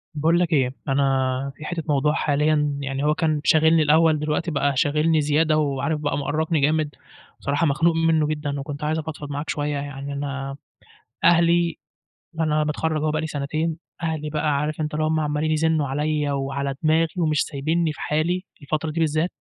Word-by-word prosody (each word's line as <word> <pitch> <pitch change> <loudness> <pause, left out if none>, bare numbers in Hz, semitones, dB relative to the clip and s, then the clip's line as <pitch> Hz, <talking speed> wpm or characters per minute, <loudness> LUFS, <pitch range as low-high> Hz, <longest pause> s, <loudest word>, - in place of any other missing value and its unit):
باقول 165 +4 +2
لك 175 -1 +1
إيه، 130 -3 +2
أنا 135 -1 +1
في 155 - -10
حتة 170 -1 -3
موضوع 150 +1 +2
حاليًا، 150 -1 +1
يعني 135 0 -3
هو 150 +1 +2
كان 155 -3 0
شاغلني 160 +1 +4
الأول، 155 +1 +4
دلوقتي 155 +3 -1
بقى 140 0 +1
شاغلني 155 +3 +2
زيادة 155 +1 +2
وعارف 150 +1 0
بقى 145 -1 -1
مؤرقني 155 +3 0
جامد، 150 0 +1 0.4
صراحة 145 +4 0
مخنوق 160 +3 +2
منه 165 -2 +2
جدًا 150 -2 -3
وكنت 145 +1 -6
عايز 155 +1 0
أفضفض 155 -2 -6
معاك 145 +2 -4
شوية، 145 0 -1
يعني 140 0 -5
أنا 140 -1 -4 0.7
أهلي 170 0 +4 0.6
أنا 155 -1 +2
متخرج 155 +1 -1
أهو 155 0 +1
بقى 155 0 -1
لي 160 - -3
سنتين، 155 +2 -2 0.3
أهلي 155 -2 -2
بقى 150 -1 0
عارف 150 +2 -2
أنت 150 0 -3
اللي 155 +1 0
هُم 160 0 +1
عمّالين 150 +1 0
يزنّوا 155 -1 +1
عليّا 150 +1 -1
وعلى 140 0 -2
دماغي 160 +1 +3
ومش 155 -4 +2
سايبينّي 155 +3 -1
في - - -11
حالي، 175 +5 0 0.2
الفترة 155 +2 -2
دي 165 - -3
بالذات 160 +2 +1
150 Hz, 175 wpm, -23 LUFS, 145-160 Hz, 0.7 s, شاغلني